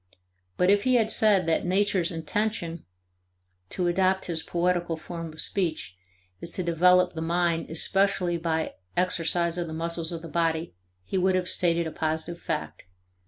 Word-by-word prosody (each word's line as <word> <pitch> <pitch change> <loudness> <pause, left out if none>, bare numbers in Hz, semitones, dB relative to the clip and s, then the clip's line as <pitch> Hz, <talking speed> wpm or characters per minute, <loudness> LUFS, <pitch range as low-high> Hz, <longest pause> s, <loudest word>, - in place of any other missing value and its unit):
But 180 +2 +4
if 205 0 +4
he 255 0 +3
had 225 -2 +3
said 205 -5 +3
that 165 -1 +1
nature's 185 -1 +1
"intention" 170 0 -2 0.8
(to 180 - -1
adopt 185 +2 +2
his 165 -2 -1
poetical 175 -1 0
form 165 0 -7
of 155 - -14
speech) 165 - -2 0.4
is 170 - -7
to 185 - -2
develop 180 +2 +4
the 160 - -5
mind 170 0 0
especially 180 +1 +1
by 160 -1 -1 0.2
exercise 170 -1 +1
of 170 - -2
the 160 - -6
muscles 165 0 -2
of 165 -1 -6
the - - -6
body 165 0 -1 0.3
he 190 - -2
would 185 0 +2
have 180 -1 0
stated 170 -2 +1
a 160 - -4
positive 160 +2 -2
fact. 155 - -4
170 Hz, 165 wpm, -26 LUFS, 165-185 Hz, 0.8 s, But